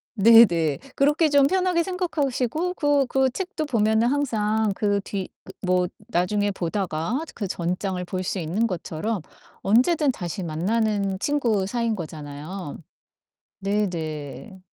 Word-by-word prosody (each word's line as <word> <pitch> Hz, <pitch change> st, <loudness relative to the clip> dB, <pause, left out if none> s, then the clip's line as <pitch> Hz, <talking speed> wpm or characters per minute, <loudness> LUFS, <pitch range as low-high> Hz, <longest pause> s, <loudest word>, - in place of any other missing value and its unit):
네네. 190 Hz, -9 st, +6 dB, 0.2 s
그렇게 295 Hz, +3 st, +3 dB
좀 280 Hz, -1 st, +5 dB
편하게 365 Hz, -1 st, +2 dB
생각하시고 330 Hz, -2 st, -1 dB
그 290 Hz, -3 st, +2 dB
그 265 Hz, 0 st, +2 dB
책도 360 Hz, -, -3 dB
보면은 220 Hz, -2 st, +2 dB
항상 220 Hz, -6 st, +1 dB
그 205 Hz, -1 st, +1 dB
뒤 195 Hz, -2 st, -4 dB, 0.2 s
그 -, -, -11 dB
뭐 180 Hz, 0 st, +2 dB, 0.2 s
나중에 205 Hz, +4 st, +1 dB
보다가 190 Hz, -, -2 dB
그 205 Hz, -4 st, -4 dB
전장을 180 Hz, +1 st, -2 dB
볼 185 Hz, +1 st, -3 dB
수 190 Hz, -, -2 dB
있는 185 Hz, +8 st, 0 dB
것처럼 185 Hz, +2 st, -3 dB, 0.4 s
언제든 270 Hz, -, +3 dB
다시 180 Hz, -4 st, -5 dB
만나는 200 Hz, +4 st, 0 dB
친구 235 Hz, -9 st, +1 dB
사이인 230 Hz, +1 st, -1 dB
거잖아요. 155 Hz, 0 st, -7 dB, 0.8 s
네 205 Hz, +1 st, +1 dB
네. 160 Hz, -, -6 dB
210 Hz, 255 characters per minute, -24 LUFS, 180-265 Hz, 0.8 s, 네네